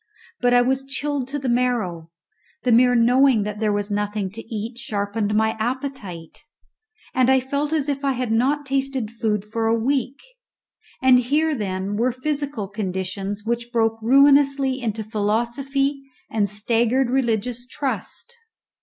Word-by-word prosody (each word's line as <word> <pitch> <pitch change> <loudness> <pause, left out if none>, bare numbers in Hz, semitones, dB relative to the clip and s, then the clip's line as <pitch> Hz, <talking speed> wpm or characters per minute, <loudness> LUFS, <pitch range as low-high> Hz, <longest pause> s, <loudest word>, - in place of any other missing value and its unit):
But 245 - +2
I 245 - +6
was 265 +2 0
chilled 275 -1 -2
to 280 +2 -3
the 270 -2 -4
marrow; 235 -10 0 0.5
the 250 - +2
mere 245 +2 +5
knowing 245 0 +4
that 210 0 -5
there 215 -1 +1
was 205 0 -2
nothing 205 -1 -2
to 225 +3 -8
eat 225 +2 -4
sharpened 205 -2 -2
my 220 +1 +3
appetite, 230 - -4 0.7
and 255 0 +3
I 265 0 +5
felt 280 +3 -2
as 305 -3 0
if 280 -1 -2
I 275 -1 +2
had 250 -2 -2
not 275 +6 +1
tasted 270 -4 -1
food 215 -3 -1
for 225 +1 -2
a 225 +1 +3
week; 265 +3 -1 0.8
and 255 -1 +7
here 300 +6 +1
then 200 -4 -3
were 245 +3 +2
physical 280 -4 -3
conditions 195 0 -4
which 235 +1 -2
broke 225 -2 +1
ruinously 275 +1 +4
into 220 -2 -2
philosophy 240 +7 -1 0.3
and 205 -2 +1
staggered 235 +5 +1
religious 245 -1 -1
trust. 290 - -4
240 Hz, 150 wpm, -22 LUFS, 210-270 Hz, 0.8 s, and